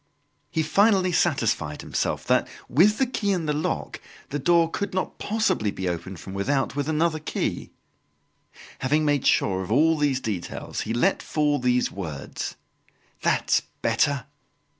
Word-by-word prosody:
He 160 - 0
finally 190 +2 +3
satisfied 115 - +1
himself - - -2
that - - +2 0.2
with 195 - +4
the 265 - +3
key 215 -5 -1
in 180 -4 0
the 150 - 0
lock, 150 +1 -3 0.3
the 145 - -2
door 170 +3 +4
could 195 +3 -4
not 185 - -2
possibly 200 - 0
be 95 -2 -4
opened 90 +1 -4
from 95 - -9
without 135 +9 0
with 145 +1 -1
another 155 0 +1
key. 155 - -3 1.1
Having 150 +4 +1
made 145 -3 +2
sure 95 -1 +2
of 95 - -6
all 160 +7 +4
these 145 -3 +1
details, 105 -9 -4
he 110 - -3
let 190 +11 +2
fall 150 -2 +1
these 125 0 +1
words: 80 -8 -5 0.7
"That's - - +2 0.2
better!" 140 -1 +1
145 Hz, 150 wpm, -25 LUFS, 115-170 Hz, 1.1 s, with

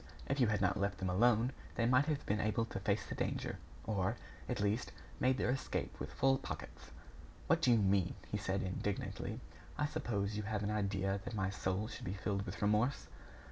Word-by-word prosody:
If 135 +1 -1
you 125 - +5
had 105 -2 +1
not 90 0 +2
left 100 -1 0
them 95 -1 -1
alone, 120 +5 +4 0.2
they 115 - +2
might 125 +4 +5
have 150 -2 0
been 105 +1 +1
able 110 +2 +1
to 100 - -5
face 100 +1 +1
the - - -5
danger, - - -2 0.2
or, 105 0 0 0.3
at - - -1
least, 105 +3 +1 0.3
made 130 0 +3
their 125 - +2
escape 130 - -2
with - - -4
full 135 0 +3
pockets." - - -7 0.6
"What 165 0 +3
do 130 - +4
you 115 - +7
mean?" 95 -3 +3 0.2
he 105 - +1
said, 100 0 -1
indignantly. 95 +1 -3 0.4
"I 150 - +2
suppose 105 -9 -1
you - - 0
have 105 0 -2
an 105 - 0
idea 100 -2 0
that 110 - -5
my 95 -2 0
soul 95 +2 -1
should 110 - -7
be 90 - -2
filled 100 +1 -2
with - - -4
remorse?" 105 +6 +2
105 Hz, 205 wpm, -36 LUFS, 100-120 Hz, 0.6 s, you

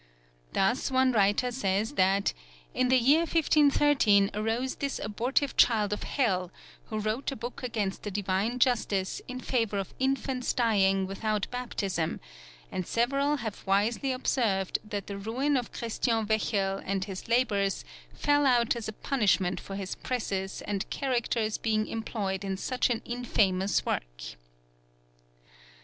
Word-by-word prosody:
Thus 225 +9 +1
one 260 0 +3
writer 210 +3 +2
says 210 -2 0
that 195 -2 +2 0.4
"in 255 0 +1
the 260 - +5
year 270 +6 +5
1530 290 -10 +4
arose 225 +5 -1
this 280 -1 -2
abortive 245 +7 -1
child 210 -3 +4
of 210 - -4
hell, 185 -10 0 0.4
who 215 - -5
wrote 215 +6 -1
a - - -4
book 240 +1 -6
against 215 -6 -2
the 210 - -4
Divine 200 +4 -1
Justice 220 -6 +1
in 255 0 -5
favour 225 -5 0
of 195 -2 -4
infants 265 -1 0
dying 195 -5 +2
without 210 +2 -1
baptism, 200 -9 -2 0.5
and 185 -2 -3
several 275 +5 +1
have 215 - -5
wisely 220 +7 +1
observed 225 -7 0
that 205 -2 -5
the 200 -1 -6
ruin 255 +8 0
of 250 -3 -1
Christian 230 -1 -1
Wechel 200 -2 0
and 195 -1 -1
his 190 -2 -7
labours 205 - +1 0.3
fell 290 -1 +2
out 240 -3 +3
as 230 -2 -5
a 215 - -4
punishment 200 -7 +1
for 195 - -8
his 195 -2 -4
presses 195 -6 -3
and 200 -2 -3
characters 235 -4 -1
being 215 -1 +1
employed 205 -4 -3
in 195 -1 -2
such 255 +6 0
an 235 -2 -1
infamous 205 -6 +1
work." - - -3
220 Hz, 140 wpm, -29 LUFS, 195-250 Hz, 0.5 s, the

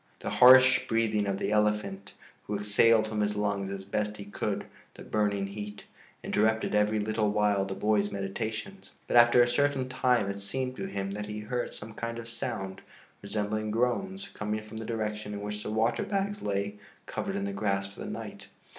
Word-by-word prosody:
The - - -3
harsh 130 +1 +7
breathing 110 -2 +1
of 100 -1 0
the - - -2
elephant, 105 -2 0 0.3
who 105 - -2
exhaled 110 +2 +4
from 110 -1 -2
his 105 0 0
lungs 100 -2 -1
as 100 -1 -5
best 105 +2 -2
he 100 - -8
could 100 - -3 0.3
the - - -10
burning 100 -2 0
heat, 105 +1 -7 0.4
interrupted 110 +1 +1
every 105 +1 +3
little 110 0 0
while 105 -1 +2
the 95 0 -4
boy's 105 -1 +2
meditations. 110 - -4 0.2
But - - -1
after 120 +1 +7
a - - +2
certain 135 +1 +1
time 125 -4 +2
it 100 0 -3
seemed 130 +6 -3
to 195 - -3
him 100 - -3
that 105 +1 -4
he 105 0 -5
heard 120 +3 -3
some 110 +1 -9
kind 115 +1 -4
of 115 0 -7
sound, 95 -4 -4 0.4
resembling 105 +1 -2
groans, 190 - -1
coming 105 0 -3
from 110 +1 -9
the 110 - -5
direction 105 -2 -3
in 100 - -5
which 105 0 -4
the - - -5
water 115 +2 +1
bags 200 0 -2
lay 100 0 -2 0.3
covered - - -3
in 100 - -1
the 100 - -3
grass 100 -1 -1
for - - -15
the - - -5
night. - - -7
105 Hz, 190 wpm, -29 LUFS, 100-115 Hz, 0.4 s, harsh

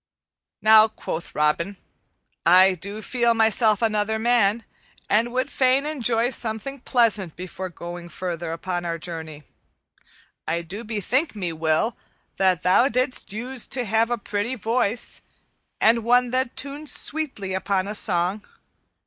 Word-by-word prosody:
"Now," 220 0 +8
quoth 170 -6 -6
Robin, 170 +6 +1 0.7
"I 185 +2 +6
do 200 +5 -7
feel 235 -2 +1
myself 220 -1 +3
another 215 0 +1
man, 230 -1 +2 0.5
and 230 +3 +3
would 255 +2 -1
fain 265 +2 +2
enjoy 245 -5 0
something 235 +3 -4
pleasant 215 -9 +1
before 185 +1 -6
going 175 0 -8
farther 170 -1 -4
upon 175 +1 -3
our 170 -1 -2
journey. 160 -3 -7 1.0
I 170 +1 -1
do 195 +7 -7
bethink 235 - -1
me, 180 -5 -3
Will, 160 +8 0 0.4
that 185 -4 +2
thou 190 +8 +5
didst 255 -2 -1
use 245 +4 -3
to 250 -1 -1
have 225 +2 +2
a 240 - 0
pretty 210 +3 -3
voice, 230 0 -1 0.6
and 230 +1 +4
one 245 +1 +3
that 255 -1 -1
tuned 285 +2 -3
sweetly 275 -11 -2
upon 190 0 -1
a 210 - -3
song. 190 0 0
215 Hz, 135 wpm, -23 LUFS, 185-240 Hz, 1.0 s, Now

